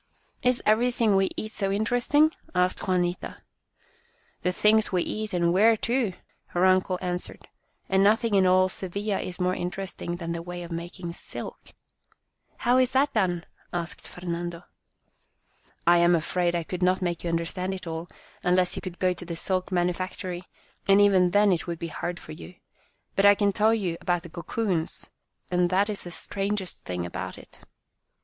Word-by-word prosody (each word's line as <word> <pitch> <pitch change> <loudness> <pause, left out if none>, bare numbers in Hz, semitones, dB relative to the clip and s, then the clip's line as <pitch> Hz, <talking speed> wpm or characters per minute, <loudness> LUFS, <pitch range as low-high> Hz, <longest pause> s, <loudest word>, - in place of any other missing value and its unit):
" - - -40
Is 250 - -5
everything 225 -1 +3
we 195 0 +3
eat 215 - -4
so 195 -2 -1
interesting? 245 +9 +3
" - - -27
asked 180 +2 +1
Juanita. 180 -1 -1 0.5
" - - -37
The 180 - +1
things 215 +3 +3
we 180 -2 +2
eat 215 0 -4
and 170 -2 +2
wear, 220 +4 +5
too," 235 -3 0 0.4
her 175 +1 +4
uncle 185 0 +3
answered, 180 0 -4 0.2
" - - -44
and 190 0 +3
nothing 220 +2 +3
in 190 -2 +5
all 185 0 +5
Sevilla 195 +2 -3
is 180 0 -5
more 180 0 +1
interesting 180 -1 -4
than 170 -1 -5
the 170 0 -3
way 175 +1 -6
of 170 - -9
making 170 +1 -5
silk." - - -8 0.4
" - - -44
How 245 +2 +5
is 255 0 +2
that 275 +3 +3
done? 175 -5 +1
" - - -32
asked 170 -1 -4
Fernando. 175 -1 -5 0.7
" - - -38
I 175 0 +6
am 175 0 +5
afraid 175 +2 0
I 170 - 0
could 180 +2 -5
not 185 +1 +2
make 175 -2 -2
you 175 - -2
under 165 0 0
stand 185 +2 -3
it 185 - -9
all, 165 +1 -4 0.3
unless 180 0 +2
you - - -4
could 180 -2 -7
go 185 -1 +2
to 175 - -10
the 170 -1 -5
silk 185 +2 0
manufactory, 180 0 -2 0.4
and 195 0 +6
even 190 -3 +5
then 205 +2 +4
it 175 -1 0
would 170 -1 -3
be 165 +1 -5
hard 175 +2 -4
for - - -11
you. 170 +3 -10 0.6
But 195 +1 +5
I 205 - +8
can 200 0 +2
tell 215 +3 +3
you 180 -6 -2
about 175 -1 0
the 170 - -9
cocoons, 175 0 -3 0.4
and 180 0 +2
that 195 +3 +2
is 205 - -4
the - - -6
strangest 195 +1 -3
thing 90 -1 -3
about 85 - -5
it. - - -15
185 Hz, 190 wpm, -26 LUFS, 175-200 Hz, 0.7 s, I